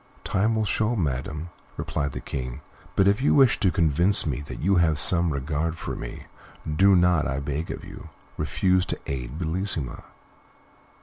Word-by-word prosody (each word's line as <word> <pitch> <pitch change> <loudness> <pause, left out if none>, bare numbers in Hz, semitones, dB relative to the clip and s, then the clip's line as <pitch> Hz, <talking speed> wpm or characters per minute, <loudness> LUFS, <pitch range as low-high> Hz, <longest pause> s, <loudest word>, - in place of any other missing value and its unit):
"Time 105 +3 +1
will 110 -1 0
show, 110 +3 0
madam," 75 - -3 0.3
replied 70 -3 -3
the - - -5
King; 65 -3 -6 0.3
"but 95 - +4
if 100 +5 +2
you 140 - +3
wish 135 -4 +5
to 95 - +3
convince 85 +4 +3
me 70 -3 -2
that 70 - -8
you 95 +3 +2
have 80 -3 +3
some 85 +5 +5
regard 75 +4 -2
for - - -5
me, - - -7 0.4
do 95 +6 +4
not, 90 -3 +3
I 65 -1 -2
beg 75 +3 -4
of - - -6
you, - - -11 0.3
refuse 90 -1 +1
to - - -3
aid 65 0 -5
Bellissima." 80 -5 -2
80 Hz, 170 wpm, -25 LUFS, 70-95 Hz, 0.4 s, wish